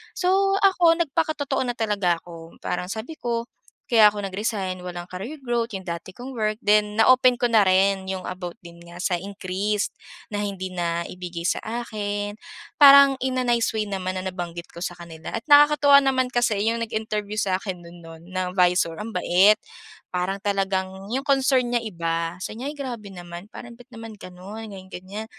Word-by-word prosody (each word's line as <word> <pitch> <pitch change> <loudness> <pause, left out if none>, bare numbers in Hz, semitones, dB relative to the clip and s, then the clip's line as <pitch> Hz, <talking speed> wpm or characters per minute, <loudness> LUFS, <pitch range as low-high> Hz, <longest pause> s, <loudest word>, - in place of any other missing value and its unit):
So 390 +2 +2
ako 350 -4 +5
nagpakatotoo 310 -2 -1
na 245 - -2
talaga 205 -6 +1
ako, 165 -1 -12
parang 180 - -2
sabi 315 +7 -10
ko, 235 0 -3 0.4
kaya 215 -3 +6
ako 205 - -4
nag-resign 195 -2 -2
walang 175 0 -7
career 235 +11 -7
growth 235 -3 -1
yung 190 - -4
dati 170 +1 -6
kong 250 +1 -9
work 215 +1 -1
then 210 -1 +3
na - - +5
open 255 -1 +6
ko 245 0 0
na 215 -3 +5
rin 190 +1 +3
yung 190 -1 -3
about 180 -1 -6
din 170 0 -13
nga 170 +1 -10
sa 180 -2 +1
increase 200 +2 -2 0.4
na 205 - -4
hindi 190 -2 -4
na 170 -1 -2
ibigay 180 -2 -7
sa 170 - 0 0.2
akin, 205 -2 -4 0.4
parang 280 -2 +8
in 255 -1 0
a - - -1
nice 235 -2 +1
way 215 -1 -2
naman 185 -1 -3
na 190 - -3
nabanggit 175 -2 -6
ko 170 +2 -6
sa 175 - -4
kanila 170 -2 -9
at 225 - -2
nakakatuwa 290 -1 +7
naman 260 -2 +2
kasi 240 -5 +1
yung 225 +2 +1
nag-interview 215 -2 -3
sa 185 -2 +1
akin 190 -3 -6
nun 170 +1 -13
nun 165 0 -11
na 185 -1 -3
visor 180 -2 +3
ang 225 - -5
bait. 190 +4 +5 0.6
Parang 180 +2 -1
talagang 195 -1 -2
yung 265 +3 -2
concern 270 -2 +3
niya 240 - +2
iba 165 -3 -3
sabi 215 +5 -6
niya 270 - -3
ay - - -11
grabe 240 -7 -6
naman 175 +1 -10
parang 240 -1 -10
bat 245 +2 -17
naman 225 -1 -9
ganun? 200 +3 -9
Ganyan-ganyan. 190 +2 -8
205 Hz, 185 wpm, -24 LUFS, 180-240 Hz, 0.6 s, parang